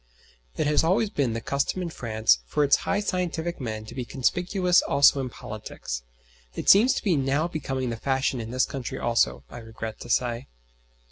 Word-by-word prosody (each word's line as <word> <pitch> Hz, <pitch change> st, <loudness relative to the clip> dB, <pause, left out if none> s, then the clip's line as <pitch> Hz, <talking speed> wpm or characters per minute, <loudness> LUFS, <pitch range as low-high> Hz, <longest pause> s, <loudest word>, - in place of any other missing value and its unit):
It -, -, 0 dB
has 150 Hz, +1 st, +3 dB
always 200 Hz, +6 st, +2 dB
been 130 Hz, -5 st, 0 dB
the 115 Hz, -, -3 dB
custom 140 Hz, +9 st, -1 dB
in 170 Hz, -, -3 dB
France 110 Hz, -, +1 dB
for 150 Hz, -, +1 dB
its 140 Hz, -, +5 dB
high 205 Hz, -, +1 dB
scientific 175 Hz, -4 st, -2 dB
men 110 Hz, -3 st, -4 dB
to -, -, -10 dB
be 130 Hz, -, -4 dB
conspicuous 180 Hz, -, +1 dB
also 140 Hz, 0 st, +4 dB
in 130 Hz, -, -4 dB
politics. 105 Hz, -, -7 dB, 0.5 s
It -, -, -5 dB
seems 225 Hz, +7 st, +7 dB
to -, -, -3 dB
be 190 Hz, -7 st, +2 dB
now 140 Hz, +3 st, +1 dB
becoming 135 Hz, -6 st, -3 dB
the 115 Hz, -, -4 dB
fashion 135 Hz, 0 st, 0 dB
in 110 Hz, -, -7 dB
this 130 Hz, +2 st, +1 dB
country 135 Hz, -4 st, -5 dB
also, 70 Hz, -, +1 dB
I 120 Hz, -, -8 dB
regret 110 Hz, -1 st, -7 dB
to -, -, -10 dB
say. 120 Hz, +1 st, 0 dB
135 Hz, 190 wpm, -26 LUFS, 115-165 Hz, 0.5 s, seems